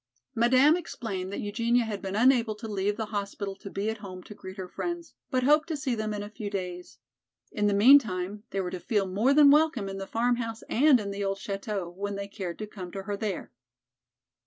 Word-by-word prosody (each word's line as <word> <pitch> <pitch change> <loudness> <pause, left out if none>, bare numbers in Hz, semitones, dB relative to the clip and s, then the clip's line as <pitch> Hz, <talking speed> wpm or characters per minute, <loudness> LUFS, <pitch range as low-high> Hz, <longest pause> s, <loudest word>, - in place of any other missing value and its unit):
Madame 255 +6 +5
explained 200 - -5
that - - -4
Eugenia 230 +4 +1
had 210 -3 -4
been 195 0 -4
unable 235 -1 +4
to 225 +2 -8
leave 205 0 -1
the 220 - -2
hospital 200 -1 -3
to 200 - -10
be 200 +2 -3
at 220 0 -2
home 185 -3 -9
to - - -10
greet 190 -1 -10
her 190 -1 -5
friends, 345 - -5 0.2
but 255 -3 +1
hoped 300 +4 +4
to 320 -3 -2
see 275 -3 -1
them 215 -2 -2
in 205 -1 -3
a 205 - -7
few 215 -2 -5
days. 180 - -5 0.5
In 210 0 +1
the 205 - +2
meantime 210 -5 +5
they 195 - -1
were 180 -1 -4
to 185 - -4
feel 205 +1 0
more 205 +8 +2
than 285 0 +7
welcome 295 -8 +3
in 195 0 -5
the 195 - -5
farmhouse 230 -1 -1
and 270 +1 +4
in 200 -2 -4
the 200 0 -3
old 195 0 -1
chateau, 195 -1 -4
when 200 +3 -5
they 200 0 -4
cared 185 -3 -6
to 215 - -4
come 190 -4 -9
to 195 - -5
her 205 +1 -3
there. 200 -2 -4
210 Hz, 225 wpm, -28 LUFS, 195-240 Hz, 0.5 s, than